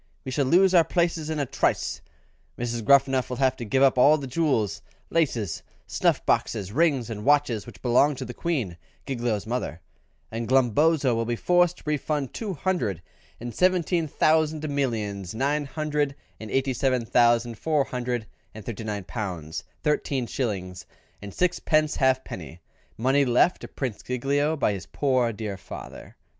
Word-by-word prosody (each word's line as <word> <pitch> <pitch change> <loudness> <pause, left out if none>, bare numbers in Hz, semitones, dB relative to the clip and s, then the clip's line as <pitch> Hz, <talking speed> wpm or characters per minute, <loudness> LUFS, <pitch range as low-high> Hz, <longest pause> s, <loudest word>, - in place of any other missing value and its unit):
We 130 - -4
shall 140 +1 +1
lose 185 +5 +5
our 170 -2 +7
places 165 -1 0
in 160 - -2
a 145 - 0
trice; - - -1 0.6
Gruffanuff 130 +2 +2
will 125 - -4
have 130 -1 +2
to - - -5
give 130 +5 +2
up 130 -2 +4
all 150 +5 +6
the 140 - -6
jewels, 130 - 0 0.3
laces, 120 - 0 0.2
snuff - - 0
boxes, 100 -3 0
rings, 135 -4 +1
and 105 -1 -5
watches 140 -6 +2
which 100 -7 -13
belong 130 +4 +4
to 130 0 -6
the 125 - -7
Queen, 125 - -2 0.3
Giglio's 120 -6 -2
mother; 110 - -3 0.5
and 115 +1 -4
Glumboso 135 +2 +3
will 115 0 0
be 120 +1 -1
forced 175 +5 +2
to - - -16
refund 150 -2 -1
two 205 -5 -4
hundred 130 - -1 0.4
and 120 0 -6
seventeen 180 - +2
thousand 155 +1 +2
millions, 110 -9 -2
nine 145 +4 0
hundred 150 -1 -1 0.2
and 110 - -8
eighty 135 +3 0
seven 130 -2 0
thousand, 120 -1 +3
four 155 -3 +2
hundred 125 -3 -3 0.3
and 110 - -9
thirty 115 -1 -5
nine 105 -2 -4
pounds 85 -3 -5 0.2
thirteen 140 -3 0
shillings 95 -7 -4 0.3
and 100 -1 -8
sixpence 155 - +1
halfpenny, 130 - -1 0.4
money 135 +5 +3
left 130 +7 +3
to - - -7
Prince 125 -7 -4
Giglio 140 +5 0
by 105 - +1
his 95 -2 -7
poor 130 -4 +1
dear 105 -2 -5
father." - - -10
130 Hz, 160 wpm, -25 LUFS, 115-150 Hz, 0.6 s, our